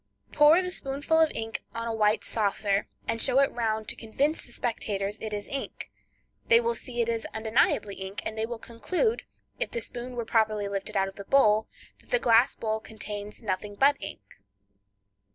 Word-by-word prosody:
Pour 305 +5 +6
the 365 - -3
spoonful 285 +1 0
of 320 -1 +5
ink 225 0 -2
on 230 0 -3
a 230 - -1
white 215 0 +2
saucer, 205 -1 0 0.2
and 230 0 0
show 265 - +4
it 275 - +4
round 220 -2 -1
to - - -2
convince 275 +8 -1
the - - -15
spectators 210 -4 -2
it 220 - -4
is 205 -1 -4
ink. 275 - -6 0.6
They 465 0 +7
will 470 0 0
see 240 - -3
it 230 - 0
is 230 -1 -1
undeniably 220 -2 +2
ink, 190 +1 -5
and 220 - -3
they 220 0 -1
will 235 0 -5
conclude, 365 - -1 0.3
if - - 0
the 235 - -3
spoon 245 +2 -6
were 235 -1 -3
properly 215 -2 +1
lifted 200 0 -3
out 195 0 +2
of 195 - -10
the 200 - -8
bowl, 215 -5 +4 0.3
that - - -21
the - - +4
glass 235 - +4
bowl 220 -1 -2
contains 210 0 -8
nothing 205 0 -3
but 280 +6 +5
ink. 105 - -9
225 Hz, 190 wpm, -28 LUFS, 210-270 Hz, 0.6 s, They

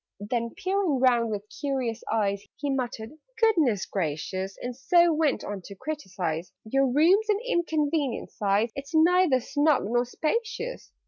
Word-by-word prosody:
Then, 230 +3 -3
peering 375 -6 0
round 240 -3 +3
with 205 -2 -3 0.2
curious 260 -5 -2
eyes, 200 -2 0
He 285 -1 -3
muttered 240 -3 -3 0.3
"Goodness 320 - +3
gracious!" 185 +3 -3
And 245 0 -5
so 340 +5 +4
went 305 -3 +1
on 205 -2 -5
to 200 - -9
criticise 185 - -4
"Your 270 +5 +2
room's 345 - +4
an 415 - +4
inconvenient 310 - 0
size: 205 +3 +1
It's 275 +4 -6
neither 335 -3 +5
snug 290 +3 +2
nor 240 +3 +1
spacious. 460 - -3
265 Hz, 140 wpm, -27 LUFS, 215-320 Hz, 0.3 s, neither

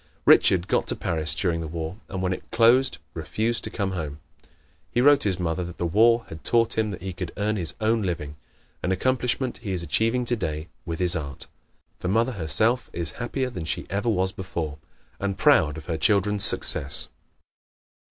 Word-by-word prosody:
Richard 90 0 +5
got - - 0
to - - +2
Paris 80 -2 -1
during 85 -3 -1
the 80 - -5
War 80 +3 -5
and 95 -1 -4
when 90 0 0
it - - -9
closed 120 -4 +3 0.2
refused 110 +8 -2
to - - -3
come 100 -3 -3
home. 75 -5 -5 0.7
He - - -1
wrote 145 +2 +5
his 95 -3 +1
mother 85 0 -2
that 90 0 -8
the 85 - -2
war 115 +7 +3
had 80 0 -10
taught 115 -1 +2
him 105 -4 -1
he 95 +1 -6
could 90 -1 -6
earn 105 +2 0
his 85 -6 0
own 110 +1 +1
living 85 -6 -4 0.5
an 90 - -1
accomplishment 125 +4 -1
he 105 -5 -4
is 90 -2 -2
achieving 115 +7 +1
today 80 -10 -2 0.2
with 80 -1 -3
his 90 -1 +4
art. 70 -4 -5 0.5
The - - -4
mother 115 +6 +1
herself 110 +6 +3
is 85 -1 -2
happier 130 +2 -2
than 90 -8 -6
she 80 - -2
ever 105 +4 -1
was 95 -3 +1
before, 85 -6 -5 0.4
and 100 -1 -3
proud 80 - +3
of 80 - -9
her 80 -1 -3
children's 105 +2 +2
success. 70 0 +4
95 Hz, 185 wpm, -24 LUFS, 85-115 Hz, 0.7 s, Richard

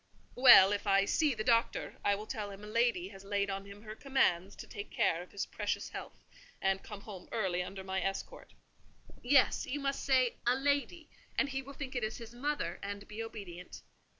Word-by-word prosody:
"Well, 245 -6 +9
if 205 0 -2
I 195 0 +4
see 295 +3 +2
the 215 - -3
Doctor, 230 0 +1
I 200 - +3
will 210 +2 -7
tell 210 -2 -4
him 200 +1 -10
a - - -8
lady 225 -5 +1
has 195 -1 -12
laid 200 0 -1
on 195 0 -4
him 200 +1 -12
her 215 -1 -7
commands 200 -9 +1
to - - -9
take 205 0 -8
care 165 - +1
of 180 - -12
his 200 - -3
precious - - -3
health - - -8 0.4
and 195 0 +1
come 205 -2 -9
home 195 -4 -10
early 190 -5 0
under 190 +1 -6
my 190 0 -2
escort." 195 +1 -5 0.7
"Yes, 265 +2 +4
you 290 - -2
must 275 -1 -2
say 255 -3 +3
a 245 - +5
lady; 285 +4 -1 0.3
and 275 - +2
he 270 0 -2
will 275 +1 -10
think 270 -2 -6
it 245 - -1
is 215 0 -2
his 230 -1 -10
mother, 250 - -2
and 200 0 -6
be 215 +1 -6
obedient. 195 -6 -8
210 Hz, 205 wpm, -33 LUFS, 195-255 Hz, 0.7 s, Well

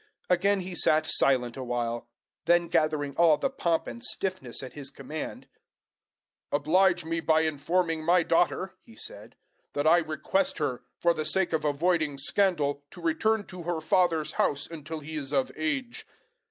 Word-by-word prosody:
Again 195 +2 +3
he 185 0 -6
sat 155 -2 +3
silent 125 -6 +2
a 130 - -4
while. 120 -1 -2 0.4
Then 175 0 +3
gathering 150 -3 +1
all 165 -3 +5
the 270 - -1
pomp 170 -11 0
and 235 - -8
stiffness 185 - -3
at 130 - -8
his 140 -2 -7
command, 145 +3 -7 1.0
"Oblige 175 +4 +3
me 165 +1 -1
by 160 -1 +3
informing 160 +2 0
my 175 +2 +4
daughter," 175 +3 +1
he 230 - -17
said, 450 +3 -10 0.4
"that 145 +1 -1
I 165 +2 +6
request 175 - -1
her, 135 -5 -2 0.2
for 170 0 +3
the 155 -2 -3
sake 190 +2 0
of 155 -1 0
avoiding 150 0 +1
scandal, 145 -2 +1
to - - -13
return 220 -11 +1
to 180 -1 -9
her 170 -1 -2
father's 165 -1 +2
house 145 0 0
until 160 -1 -7
she 160 +2 -8
is 145 -3 -4
of 135 -3 +1
age." 240 - -3
160 Hz, 165 wpm, -28 LUFS, 145-180 Hz, 1.0 s, I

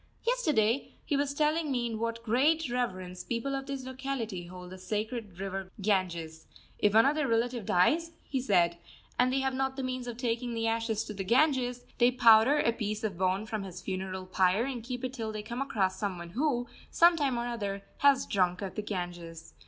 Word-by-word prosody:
Yesterday 285 - +1
he 290 - 0
was 285 0 +1
telling 305 0 +1
me 245 -2 0
in 225 -2 -3
what 230 0 -3
great 275 +6 +2
reverence 185 -7 -3
people 240 +4 -2
of 270 0 -3
this 275 -2 -4
locality 255 -8 -4
hold 180 0 -10
the 185 - -9
sacred 210 0 -4
river 195 -1 -4
Ganges. 170 -5 -1 0.3
If 210 0 +3
one 225 - +7
of 280 - +4
their 300 -3 0
relatives 230 -1 0
dies, 320 - +3
he 265 -2 -2
said, 175 -7 +2 0.4
and 250 +1 +4
they 270 +1 +1
have 265 0 0
not 265 0 -1
the 270 - -4
means 255 -1 -3
of 235 -1 -5
taking 240 -1 -2
the 225 0 -1
ashes 225 -1 0
to 210 - -7
the 195 -1 -4
Ganges, 250 +1 +2
they 240 0 +6
powder 235 +2 +6
a 235 -5 +2
piece 215 -2 -3
of 210 -4 -1
bone 190 +3 0
from 220 -1 -3
his 185 -2 -7
funeral 185 0 -4
pyre 185 +4 +2
and 260 -3 -4
keep 245 +1 -5
it 255 - -4
till 225 -4 -4
they 215 -1 -5
come 235 +4 -4
across 190 -8 0
some 195 -3 -2
one 170 0 -8
who, 245 - 0 0.2
some 340 0 +6
time 280 -6 0
or 235 - -1
other, 200 -5 -3 0.2
has 280 -2 +5
drunk 180 -1 +1
of 190 - -4
the 215 - -3
Ganges. 175 -5 -6
230 Hz, 205 wpm, -30 LUFS, 190-260 Hz, 0.4 s, one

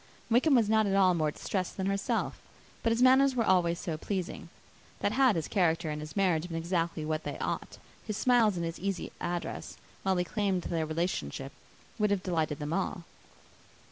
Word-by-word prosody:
Wickham 265 +5 +5
was 230 -4 +4
not 220 0 +3
at 195 - +1
all 190 -2 +5
more 155 -3 +1
distressed 185 +4 -3
than 190 - -1
herself; 195 +1 -1 0.4
but 230 - +1
his 230 +2 +2
manners 265 +1 +6
were 235 - +2
always 175 -4 +3
so 165 -5 -3
pleasing, 185 +2 -4 0.5
that, - - +1
had 260 -5 +4
his 160 -3 -2
character 165 -4 +1
and 150 0 -4
his 150 0 -8
marriage 180 -4 +2
been 165 -2 -4
exactly 165 -1 -1
what 155 0 -2
they - - -4
ought, - - -4 0.3
his 215 -2 -4
smiles 235 -5 +4
and 170 -1 -2
his 165 0 -5
easy 195 0 -3
address, 175 0 -4 0.2
while 190 -1 +1
he 180 - +2
claimed 195 -2 -1
their 160 -2 -1
relationship, 150 - -2 0.5
would 210 0 +3
have 200 -2 0
delighted 160 -5 -1
them 150 +1 -4
all. 190 -1 -2
180 Hz, 190 wpm, -30 LUFS, 165-205 Hz, 0.5 s, manners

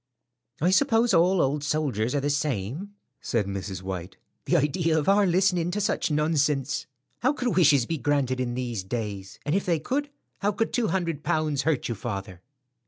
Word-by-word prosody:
"I 175 +4 +3
suppose 230 0 +3
all 180 +2 +4
old 145 +2 0
soldiers 145 -6 0
are - - +2
the 145 +1 0
same," 145 - -2 0.3
said 115 -4 0
Mrs. 95 -1 -5
White. 95 -1 -6 0.3
"The - - +3
idea 160 +3 +1
of 155 - -1
our 200 0 +5
listening 180 -1 +2
to 195 +4 -2
such 200 - 0
nonsense! 150 -2 0 0.3
How 260 +4 +2
could 250 -4 -1
wishes 145 -8 +5
be 165 +2 -3
granted 130 -1 0
in 120 -1 -2
these 120 -6 -3
days? 100 -3 -5
And 145 - 0
if 195 - +1
they 170 -2 +3
could, 285 - -2 0.3
how 205 +1 +1
could 225 +3 -1
two 240 -3 +1
hundred 170 -7 -1
pounds 155 -3 0
hurt 150 -1 0
you, 120 - -2
father?" 95 -5 -6
150 Hz, 180 wpm, -26 LUFS, 120-180 Hz, 0.3 s, our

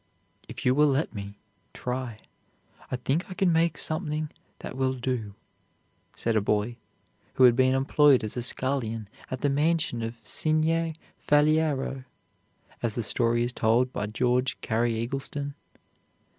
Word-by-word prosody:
"If - - -8
you 125 - +5
will 150 +2 +4
let 140 +3 0
me 100 -1 -7 0.4
try, 125 -3 -4 0.7
I - - -1
think 135 +9 -1
I 185 - -7
can 180 -3 +2
make 165 -1 +2
something 155 -2 0 0.3
that - - -8
will 130 0 0
do," 120 -5 -3 0.8
said 115 -1 -1
a 110 - +3
boy 105 +3 0 0.6
who 130 - +4
had 125 -2 +7
been 130 +1 +3
employed 135 0 +4
as 110 - -3
a 125 - -2
scullion 115 -4 -1 0.2
at 130 - -5
the - - +2
mansion 150 -4 +1
of 115 +1 -4
Signer 160 +1 0 0.3
Faliero, 150 -3 +2 0.8
as 115 -3 -1
the 120 - -1
story 120 +1 +2
is 120 +1 -2
told 120 +3 +2
by 105 - -2
George 125 +3 0
Cary 115 0 0
Eggleston. 140 +4 -4
130 Hz, 145 wpm, -27 LUFS, 115-150 Hz, 0.8 s, had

